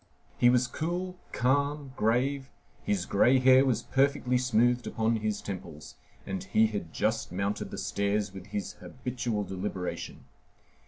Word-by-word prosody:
He 120 - +6
was 125 0 +4
cool, 180 +7 -3
calm, 140 +2 0
grave, 130 +5 +1 0.3
his 95 -3 0
gray 120 +8 +4
hair 130 +1 +6
was 120 -4 +1
perfectly 135 -2 +1
smooth 120 0 +2
upon 115 +1 +1
his 105 -1 -2
temples, 85 -6 -7 0.3
and 95 -1 -4
he 110 - +3
had 105 -7 -3
just 110 -1 -1
mounted 100 +3 -2
the - - -7
stairs 100 -1 -1
with 95 0 -9
his 100 -3 -4
habitual 120 -4 -3
deliberation. 95 -1 -5
115 Hz, 140 wpm, -29 LUFS, 100-130 Hz, 0.3 s, He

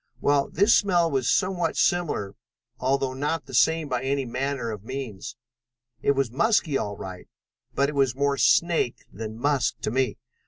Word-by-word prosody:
Well, 140 -1 +2
this 205 +4 +4
smell 175 -4 +2
was 130 -3 0
somewhat 185 -2 +1
similar, 165 - 0 0.5
although 135 0 0
not 145 +4 -2
the - - -12
same 155 +6 +3
by 125 -3 -1
any 135 0 -1
manner 125 -1 -2
of 105 -2 -7
means. 120 -3 -6 0.7
It 140 - +3
was 135 -4 -1
musky 155 - +2
all 100 -5 -2
right, 95 -1 -8 0.5
but 140 - +2
it 150 - -4
was 135 -3 +1
more 140 0 +1
snake 170 -8 +2
than 110 +1 -6
musk 140 +1 0
to - - -2
me. 130 +1 0
135 Hz, 165 wpm, -25 LUFS, 120-150 Hz, 0.7 s, this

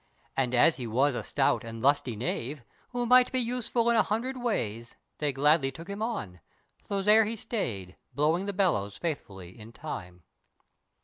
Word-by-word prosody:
And 125 -2 +1
as 155 +6 +5
he 125 -3 -4
was 130 +6 +2
a - - -2
stout 135 -3 +1
and 115 0 -7
lusty 130 -2 +2
knave 125 +4 -3 0.3
Who 245 -1 -2
might 250 +1 +6
be 260 - 0
useful 240 -1 0
in - - +3
a 220 - +6
hundred 235 +6 -2
ways, 115 - -2 0.2
They 150 -1 0
gladly 140 +1 +3
took 165 +6 -11
him 200 +1 -6
on, 110 - -3 0.4
so 200 -1 -3
there 215 +2 +6
he 225 +2 -3
stayed 105 - -4 0.2
Blowing 160 +7 +1
the - - 0
bellows 155 - +1
faithfully 95 - -5
in 110 +2 -11
time. 90 - -8
145 Hz, 175 wpm, -28 LUFS, -, 0.4 s, might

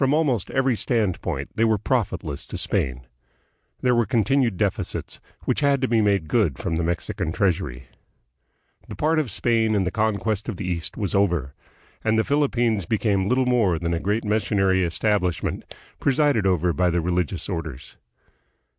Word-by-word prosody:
From 135 +2 +3
almost 135 - +1
every 135 -2 +1
standpoint 110 -5 -1
they 115 - +1
were 110 -1 +3
profitless 95 - -2
to - - -6
Spain. 65 -1 -1 0.8
There 125 -1 +3
were 120 -2 +2
continued 125 -3 +2
deficits, - - -2 0.3
which - - +1
had 140 -1 +3
to 130 - +1
be 115 -2 +2
made 100 -6 +1
good 95 - +1
from 80 - -2
the 85 - 0
Mexican 80 -1 -2
treasury. 90 - -1 1.0
The - - -7
part 155 +1 +1
of 145 -6 -1
Spain 110 +1 +1
in 100 - +2
the 90 - -2
conquest 110 -1 -1
of - - -4
the 95 - -5
East 85 -2 -3
was 100 -3 -2
over, 85 -9 +1 0.5
and 110 0 +2
the 110 - +3
Philippines 120 - +1
became 100 -3 +1
little 130 +1 +2
more 115 -9 +2
than 85 +1 -2
a 85 - 0
great 105 +5 -1
missionary 100 -3 +2
establish 90 0 0
ment, - - -4 0.3
presided 140 -7 +2
over 90 -2 +2
by 90 +1 +2
the 85 0 +1
religious 90 0 -1
orders. 80 -7 -6
100 Hz, 170 wpm, -23 LUFS, 90-120 Hz, 1.0 s, From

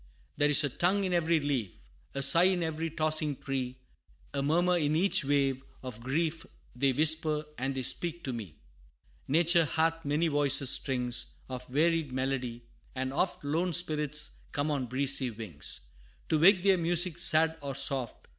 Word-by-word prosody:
There 145 - +2
is 150 +1 +4
a 145 - 0
tongue 185 +9 0
in 185 -1 -2
every 170 -1 +2
leaf, 140 -9 -2 0.5
A 140 - 0
sigh 170 +5 +5
in 185 -2 +2
every 160 0 -3
tossing 155 -2 0
tree 130 -2 -4 0.6
A 140 - -2
murmur 175 +5 +2
in 155 -3 0
each 185 0 +2
wave; 135 -1 0 0.2
of 125 -4 -7
grief 160 +6 -2 0.3
They 135 +2 +2
whisper, 155 +2 +2
and 135 +1 -2
they 130 - -3
speak 170 +6 -1
to 130 - -4
me. 105 -10 -8 0.7
Nature 170 +3 +3
hath 165 +3 -1
many 150 +4 0
voices 145 -3 +3
strings 125 -2 -1
Of 125 -1 -8
varied 160 +2 0
melody: 130 -2 -3 0.3
and 130 0 -3
oft 175 +3 -1
Lone 165 +5 -1
spirits 150 -3 +1
come 145 +2 -2
on 135 -4 -2
breezy 135 +1 +2
wings, 105 -10 -4 0.5
To 155 - +2
wake 185 +2 +5
their 195 -2 +3
music 175 0 +2
sad 160 -1 +4
or 140 -2 -5
soft. 135 -3 -2
150 Hz, 165 wpm, -29 LUFS, 135-165 Hz, 0.7 s, sigh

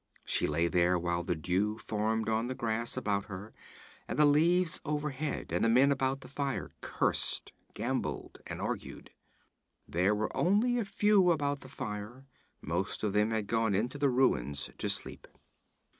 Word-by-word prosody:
She - - +2
lay 85 +3 +1
there, 90 +1 +3
while 85 0 -1
the 90 - -1
dew 95 +7 0
formed 110 0 -1
on 110 +1 +1
the 130 - -3
grass 115 0 -2
about 100 -1 0
her 100 +2 -8 0.5
and - - -4
the 150 - +6
leaves 165 +4 +3
overhead, 150 0 -3
and - - +1
the 115 - +4
men 130 +5 +5
about 135 0 0
the - - -11
fire 140 0 -3
cursed, - - 0 0.2
gambled - - -3
and - - -6
argued. - - -5 0.8
There 90 +5 +2
were 110 +1 -2
only 225 +7 +2
a 225 - -1
few 195 -1 +4
about 145 -4 +1
the 130 - -12
fire; 110 +2 -6 0.4
most 90 +8 -2
of 105 -2 0
them 105 +1 +3
had 110 -2 -1
gone 115 -1 +1
into 120 +8 -1
the 140 -1 +3
ruins 70 - +1
to - - -1
sleep. - - -3
115 Hz, 165 wpm, -31 LUFS, 100-145 Hz, 0.8 s, the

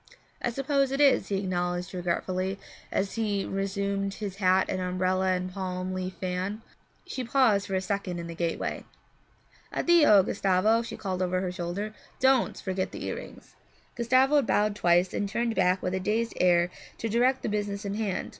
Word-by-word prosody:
'I - - 0
suppose 275 +2 0
it 275 - -1
is,' 275 -9 +4
he 200 - -1
acknowledged 180 -1 -2
regretfully, 185 +2 -2 0.3
as 195 0 -1
he 210 -3 -1
resumed 195 0 -2
his 200 -2 -5
hat 190 -1 +3
and 185 - -2
umbrella 185 +1 +1
and 185 0 -3
palm 185 -1 -3
leaf 185 0 -4
fan. 185 +4 -3 0.4
She 255 - -4
paused 225 -5 +3
for 195 - -2
a 185 - +1
second 195 -2 -3
in 170 - -5
the 170 - -6
gateway. 165 0 -2 0.9
'Addio, 295 - +5
Gustavo,' 195 +5 +2
she 235 - -7
called 185 -2 -3
over 185 0 +1
her 185 -1 -2
shoulder. 180 +5 -4 0.3
'Don't 265 -1 +3
forget 185 -1 -2
the - - -6
earrings.' - - -7 0.4
Gustavo 260 +5 +4
bowed 210 -4 +1
twice 175 -1 +3
and 205 - -1
turned 235 +2 0
back 185 -2 +2
with 180 - -1
a 190 - 0
dazed 220 +4 -1
air 175 -1 +4 0.3
to 230 - -3
direct 245 +4 +2
the - - -1
business 205 0 -2
in 200 - -2
hand. 210 -3 -2
195 Hz, 175 wpm, -28 LUFS, 185-220 Hz, 0.9 s, Addio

